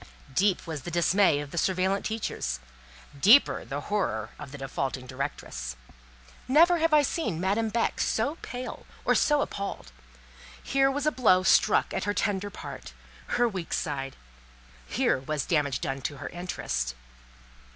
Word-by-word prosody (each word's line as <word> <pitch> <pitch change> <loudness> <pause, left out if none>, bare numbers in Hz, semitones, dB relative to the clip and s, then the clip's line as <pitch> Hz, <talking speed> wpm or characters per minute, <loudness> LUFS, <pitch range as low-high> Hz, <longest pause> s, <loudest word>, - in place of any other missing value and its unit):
Deep 190 +4 +2
was 160 -4 -5
the 175 - -6
dismay 175 -1 +3
of 145 -1 -8
surveillante 190 +3 +1
teachers, 205 - -3 0.6
deeper 225 - +6
the 135 +5 -5
horror 120 - -2
of 135 - -8
the 145 - -8
defaulting 135 -1 -3
directress. 125 - -5 0.7
Never 335 +6 +5
had 325 0 +2
I 300 -1 +6
seen 235 - -1
Madame 205 +5 +1
Beck 230 +1 0
so 280 +9 0
pale 250 0 -7 0.2
or - - +4
so 295 -1 +3
appalled. 200 - -4 0.7
Here 270 0 +3
was 285 +1 -2
a 305 - +3
blow 185 -10 +4
struck - - +4
at - - -2
her 205 0 -1
tender 205 -1 0
part, 190 - -9 0.4
her 245 0 +4
weak 190 -6 -4
side; 135 -4 -2 0.7
here - - +1
was 150 +2 -3
damage 145 -6 +1
done 135 0 -3
to 145 - -4
her - - -6
interest. 65 - -3
185 Hz, 150 wpm, -28 LUFS, 140-225 Hz, 0.7 s, deeper